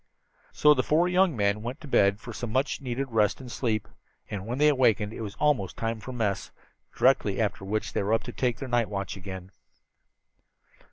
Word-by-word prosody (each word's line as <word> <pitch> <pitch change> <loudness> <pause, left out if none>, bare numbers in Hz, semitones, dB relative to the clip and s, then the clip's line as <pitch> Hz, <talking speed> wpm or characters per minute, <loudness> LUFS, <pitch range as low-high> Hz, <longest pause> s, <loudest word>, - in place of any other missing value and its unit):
So 150 0 +5
the 130 - +1
four 160 +7 +2
young 180 -5 +3
men 100 0 +1
went 125 +6 -5
to 155 - -9
bed 100 -6 +3
for 120 +1 -9
some 120 -1 -5
much 135 +4 0
needed 130 0 -3
rest 105 -2 +2
and 130 -2 -9
sleep, 110 -4 -1 0.4
and 100 0 -5
when 120 +2 -3
they 150 +1 +4
awakened 115 -6 +2
it - - -7
was 105 -2 -6
almost 115 -12 +1
time 115 0 -2
for 130 - -8
mess 110 -6 -2 0.5
directly - - +3
after - - -1
which 105 +1 -2
they - - 0
were 105 +3 +2
to 120 - -8
take 125 -1 0
up - - -21
their 135 - -4
night 120 -2 +1
watch 100 -2 -4
again. 95 -1 -8
115 Hz, 205 wpm, -27 LUFS, 105-130 Hz, 0.5 s, So